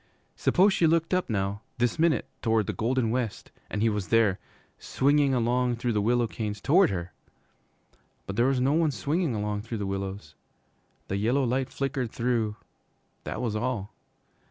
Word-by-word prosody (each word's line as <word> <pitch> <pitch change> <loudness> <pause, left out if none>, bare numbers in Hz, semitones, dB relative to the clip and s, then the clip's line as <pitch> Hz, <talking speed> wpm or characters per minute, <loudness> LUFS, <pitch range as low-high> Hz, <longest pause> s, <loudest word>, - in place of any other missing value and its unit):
Suppose 195 +2 +3
she 170 - +3
looked 165 +2 +1
up 185 -5 +1
now, 100 -1 -1 0.2
this 120 +4 0
minute, 165 -1 +2
toward 110 -2 +2
the - - -3
golden 120 0 0
west, 120 -3 -3 0.2
and 105 - -2
he 115 - +4
was 105 -3 -2
there, 110 -5 +3 0.4
swinging 140 0 +2
along 125 +1 +1
through 120 0 -1
the 105 - +1
willow 120 +3 +2
canes 105 -2 -4
toward 175 - +4
her! 90 -2 -4 1.1
But 95 - -5
there 120 +4 +3
was 135 -1 +1
no 135 +3 +2
one 160 0 +3
swinging 145 0 -1
along 105 0 -2
through 115 +1 -5
the 100 - -3
willows. 95 -4 -5 0.7
The 95 - -2
yellow 120 +7 +1
light 130 +1 0
flickered 135 -3 -2
through 115 -3 -1 0.7
that - - -4
was 110 -3 -1
all. 110 -3 -2
120 Hz, 170 wpm, -27 LUFS, 105-135 Hz, 1.1 s, he